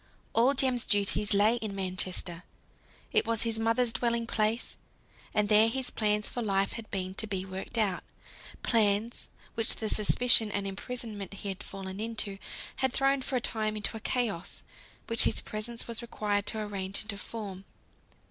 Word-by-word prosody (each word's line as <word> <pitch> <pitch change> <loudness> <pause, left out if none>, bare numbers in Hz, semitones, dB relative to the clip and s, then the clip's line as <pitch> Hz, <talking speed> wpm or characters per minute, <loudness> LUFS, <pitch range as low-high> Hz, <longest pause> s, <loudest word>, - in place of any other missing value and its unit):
All 250 +5 +4
Jem's 255 -3 +3
duties 205 0 +4
lay 210 +3 +5
in 215 -4 -4
Manchester. 185 -2 -1 0.7
It - - +3
was 230 -1 +2
his 225 -1 0
mother's 230 +1 +2
dwelling 235 -1 +1
place, 220 +1 0 0.6
and 210 -1 +2
there 215 +1 +6
his 260 +2 0
plans 210 -1 +1
for 245 - -2
life 195 -3 +1
had 230 -2 -8
been 185 -2 -2
to 220 +3 -2
be 190 -2 -2
worked 190 +5 -6
out; 200 -5 +1 0.6
plans, 220 0 +2 0.2
which 225 -1 +1
the 220 - -2
suspicion 220 +1 +4
and 200 0 -1
imprisonment 205 0 -5
he 200 - -4
had 195 +1 -4
fallen 195 -1 -7
into, 215 -3 -1 0.4
had 265 -2 +1
thrown 275 0 +3
for 260 - -3
a 250 - +1
time 215 -2 0
into 210 +2 -2
a - - -4
chaos, 220 -6 -2 0.4
which 230 0 +2
his - - +2
presence 230 +2 -4
was 235 0 -1
required 205 -3 -1
to 220 - -1
arrange 200 -2 -2
into 215 -1 -3
form. 200 -5 -6
215 Hz, 165 wpm, -30 LUFS, 200-230 Hz, 0.7 s, there